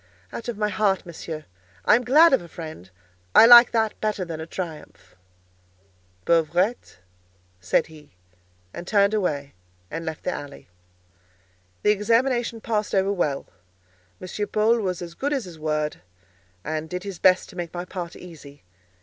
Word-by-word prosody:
"Out 235 - -6
of 240 -3 -4
my 210 0 0
heart, 200 -3 0
Monsieur. 160 -2 -7 0.4
I - - +6
am 245 - 0
glad 300 +6 +6
of 265 - +4
a 170 - -11
friend. 155 - -9 0.5
I - - +10
like 240 0 +10
that 220 -2 -1
better 210 -3 -1
than 165 -2 -6
a 160 - -7
triumph." 165 -4 -8 1.1
"Pauvrette?" 170 +7 +1 0.6
said 90 - +1
he, 150 - -17 0.6
and 175 - -8
turned 200 0 +3
away 150 -9 -1 0.4
and 165 - -4
left 160 -2 -6
the - - -1
alley. 145 -1 -8 1.2
The 210 - +5
examination 230 +2 +1
passed 215 -3 -1
over 195 +1 +2
well; 150 -7 -1 0.7
M. 205 +3 -4
Paul 220 +2 +2
was 180 -4 -3
as 170 -1 -8
good 285 +11 -2
as 265 -7 -2
his 170 -3 -11
word, 155 -1 -2 0.6
and 155 +1 -4
did 180 0 -5
his 195 -4 -7
best 185 0 +4
to - - -13
make 175 -2 -5
my 175 0 -5
part 180 -2 -6
easy. 145 - -13
180 Hz, 160 wpm, -24 LUFS, 160-215 Hz, 1.2 s, I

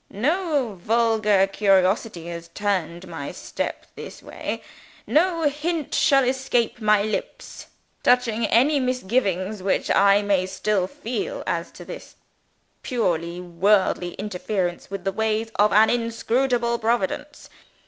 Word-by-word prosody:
No 280 - -1
vulgar 220 -2 +3
curiosity 195 -1 +1
has 170 0 -7
turned 185 -2 -2
my 160 -5 -6
steps - - -5
this - - -10
way. - - -5 0.4
No 335 +1 +2
hint 300 +1 -1
shall 275 -1 +4
escape 250 -2 0
my 210 -1 +4
lips, 215 - -5 0.3
touching 235 -2 +2
any 280 +5 +3
misgivings 215 -6 -1
which 190 +1 0
I 200 +1 +5
may 195 -2 +1
still 190 0 0
feel 390 - -4
as - - -2
to - - -11
this - - -10 0.7
purely 175 -8 -1
worldly 180 0 +1
interference 190 -3 -3
with 195 -2 -6
the 195 - 0
ways 220 +2 -1
of 210 0 +4
an 215 +2 +5
inscrutable 235 +1 0
Providence. 240 +6 -2
215 Hz, 120 wpm, -23 LUFS, 190-250 Hz, 0.7 s, I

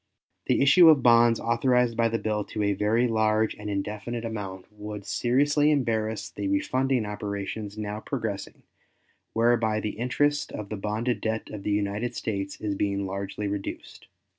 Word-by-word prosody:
The - - +3
issue 165 +4 +8
of 145 -5 +5
bonds, 115 -1 +5
authorized 120 0 +2
by 115 0 +2
the 115 - 0
bill 105 -1 -1
to 105 - -3
a 100 0 +2
very 110 +5 +2
large 110 -1 +2
and 105 0 -7
indefinite 105 +4 -3
amount, 100 -4 -5
would 105 -1 -7
seriously 145 +7 +2
embarrass 110 -6 0
the - - -4
refunding 135 - +1
operations 105 0 -5
now 105 0 -4
progressing, 110 -5 -5 0.7
whereby 115 -2 +2
the 105 0 -4
interest 145 +4 0
of 105 -2 -6
the 110 - -3
bonded 105 +2 -2
debt 110 0 -3
of 105 - -6
the 105 - -3
United 105 +3 -1
States 100 -2 -3
is 105 -2 -2
being 100 0 -1
largely 100 +2 -4
reduced. 100 0 -6
110 Hz, 160 wpm, -26 LUFS, 105-120 Hz, 0.7 s, issue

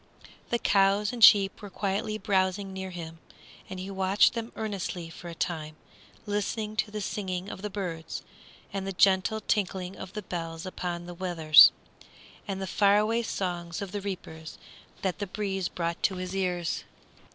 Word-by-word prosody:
The 240 - +2
cows 200 0 +3
and 235 -2 -1
sheep 200 -2 +7
were 205 - -8
quietly 200 +2 -2
browsing 190 -2 0
near 190 0 -5
him, 165 -2 -8 0.5
and 185 - -6
he 190 +2 -5
watched 190 +1 +3
them 230 0 -4
earnestly 190 -6 -4
for 175 - -10
a 170 - -8
time, 155 -3 -3 0.5
listening 210 +1 -2
to 215 - +1
the 210 0 -5
singing 190 -2 -3
of - - -8
the 210 - -3
birds, 175 -5 -5 0.5
and 195 -1 -3
the 195 - -3
gentle 190 +3 +3
tinkling 190 -3 -1
of 190 - -9
the 210 - -5
bells 165 -2 -5
upon 175 -2 -4
the 175 - -7
wethers, 170 -4 +7 0.8
and 195 -1 -3
the 190 - -3
far 200 +2 +4
away 225 +3 +2
songs 175 -6 -3
of 200 -3 -5
the 205 - -3
reapers 160 -5 -7 0.5
that 190 -2 -1
the 205 - -3
breeze 195 -2 -2
brought 170 -1 -3
to 190 - +2
his 185 +1 -5
ears. 180 -3 -1
190 Hz, 170 wpm, -28 LUFS, 175-205 Hz, 0.8 s, sheep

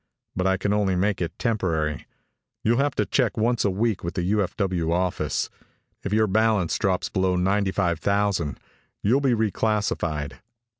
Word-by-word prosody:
But 95 0 0
I 95 0 +2
can 100 +1 0
only 100 -3 +1
make 95 +1 0
it 85 -1 -3
temporary. 80 - -1 0.6
You'll 120 +3 +2
have 140 0 +1
to - - +1
check 125 -5 +1
once 115 +2 +1
each 100 - +2
week 110 +1 0
with 85 - -4
the 90 - -1
U.F.W. 95 -3 0
office. 90 +1 0 0.5
If 100 - -4
your 110 +1 +4
balance 110 -3 +2
drops 95 -2 +1
below 95 -2 +1
ninety 95 +2 +1
five 85 -5 0
thousand, 100 -6 0 0.4
you'll 125 +7 +3
be 130 -4 +3
reclassified." 100 -9 -1
100 Hz, 160 wpm, -24 LUFS, 90-110 Hz, 0.6 s, your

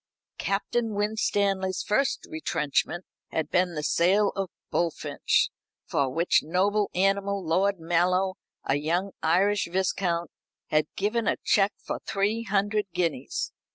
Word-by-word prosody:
Captain 215 +2 -1
Winstanley's 200 -3 0
first 250 +5 +1
retrenchment 160 +2 -1 0.2
had 155 -1 -3
been 180 -1 +2
the 150 - -3
sale 195 +7 +3
of 195 -2 -2 0.2
Bullfinch, 170 -2 +1 0.4
for 140 -2 0
which 165 +7 +2
noble 200 +5 +1
animal 195 0 +1
Lord 190 +4 +2
Mallow, 180 +3 +1 0.3
a 135 - +1
young 175 +6 -1
Irish 195 +5 +2
viscount, 180 -2 0 0.4
had 155 0 +2
given 215 +3 0
a - - +2
cheque 200 0 +3
for - - -5
three 205 +3 0
hundred 205 0 0
guineas. 155 -7 -1
190 Hz, 120 wpm, -27 LUFS, 170-200 Hz, 0.4 s, sale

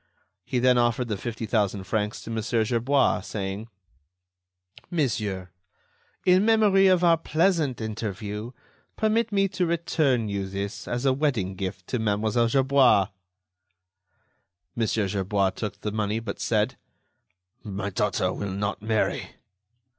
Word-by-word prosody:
He 130 - -2
then 125 0 +4
offered 120 0 +1
the 105 - 0
fifty 115 +3 -5
thousand 105 -3 0
francs 105 +2 -2
to 115 - -7
Mon. 115 -1 -1
Gerbois, 120 +4 +1
saying: 100 +1 -5 1.2
"Monsieur, 105 - -1 0.7
in 185 +1 +5
memory 210 -3 +5
of 185 -1 +4
our 170 -1 +5
pleasant 160 -5 +1
interview, 105 0 -4 0.5
permit 220 +1 +1
me 195 -1 +3
to 180 - -1
return 155 -8 +1
you 100 -1 -3
this 100 +2 -5
as 120 +2 -2
a 135 - +4
wedding 130 -10 0
gift 95 -1 -5
to 125 - -1
Mlle. 110 +2 +1
Gerbois." 130 -5 +4 1.7
Mon. 115 -2 0
Gerbois 100 -2 0
took 105 +1 -6
the 105 - -2
money, 105 0 -1
but 110 -3 -6
said: - - 0 0.9
"My 100 -2 -4
daughter 95 -1 0
will 100 - -4
not 100 +2 -3
marry." 110 0 -1
110 Hz, 130 wpm, -26 LUFS, 100-135 Hz, 1.7 s, in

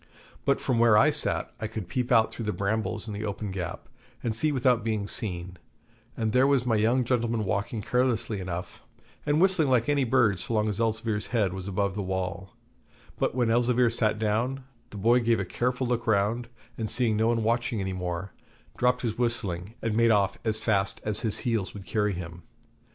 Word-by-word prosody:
But 140 - +2
from 125 -4 0
where 115 -2 +6
I 150 +8 +5
sat 150 - 0
I 110 - -2
could 110 -4 -6
peep 125 +4 -2
out 115 -2 +4
through 115 - -6
the 105 - 0
brambles 105 +1 -2
in 105 - -5
the 105 +1 -4
open 105 -1 -4
gap, 90 -3 -5 0.4
and 115 -2 -1
see 150 +7 +2
without 125 -4 +2
being 110 -3 -1
seen 90 -5 -4 0.6
and 110 -2 0
there 130 +4 +4
was 135 -3 +2
my 115 -3 +2
young 115 +4 +2
gentleman 115 -2 0
walking 105 +2 -2
carelessly 115 -3 0
enough, 90 -1 -6 0.5
and 145 +1 +3
whistling 180 -5 +3
like 120 -3 +3
any 145 -2 +2
bird 105 -5 +3
so 120 -2 -3
long 105 0 +2
as 105 - -3
Elzevir's 110 -2 -1
head 105 -7 0
was 95 0 -6
above 100 0 0
the 105 - -3
wall; 95 0 -4 0.6
but - - 0
when 120 -3 +2
Elzevir 120 0 +3
sat 110 -2 +2
down, 115 +5 -1 0.3
the 105 - -9
boy 115 +5 +4
gave 115 -2 +2
a 95 - -1
careful 125 +6 -1
look 120 -1 -1
round, 110 +3 +1 0.3
and 110 -2 -2
seeing 120 -3 +1
no 110 +1 +2
one 115 -1 +1
watching 115 0 0
any 95 -1 -2
more, 90 +1 -4 0.4
dropped 125 0 +2
his 115 -1 -2
whistling 105 -5 -2
and 110 -2 0
made 115 +1 +4
off 100 -3 +2
as 110 -1 0
fast 100 -4 +1
as 105 -1 +1 0.2
heels 115 -6 -1
would 100 -2 -8
carry 105 +1 0
him. 85 -1 -7
110 Hz, 200 wpm, -27 LUFS, 100-120 Hz, 0.6 s, where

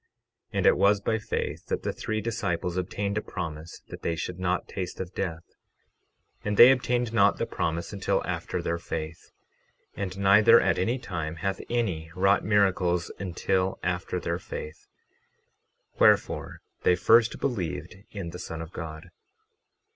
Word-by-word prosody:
12:17 - - -3
And - - +1
it - - +6
was 100 +1 +4
by 110 +2 0
faith 105 - -4
that - - -2
the - - -2
three 110 -1 -3
disciples 95 -6 -2
obtained 100 +3 -2
a - - -6
promise 80 -4 -7
that - - -9
they 85 - -1
should 90 +2 -5
not 90 0 -1
taste 90 -2 -5
of 95 -1 -5
death; 85 -4 -3 1.0
and 105 -1 -1
they 120 +2 +10
obtained 125 -2 0
not 100 -2 +4
the - - -1
promise 85 +5 -3
until 100 -2 0
after - - -3
their 85 0 -1
faith. 80 -1 -6 0.7
12:18 - - -5
And 95 -1 -5
neither 105 +4 +7
at - - +1
any 115 +8 +1
time 85 -9 -4
hath 95 +3 -2
any 95 -10 -1
wrought 95 +2 +3
miracles 95 -4 +2
until 95 0 -1
after 90 +1 -2
their 85 0 -2
faith; 80 -2 -8 1.1
wherefore - - +3 0.2
they 90 - +4
first 115 +6 +4
believed 95 - -3
in 95 -5 -6
the 90 - -8
Son 80 - -6
of 80 - -12
God. 80 -2 -7
95 Hz, 160 wpm, -27 LUFS, 85-105 Hz, 1.1 s, they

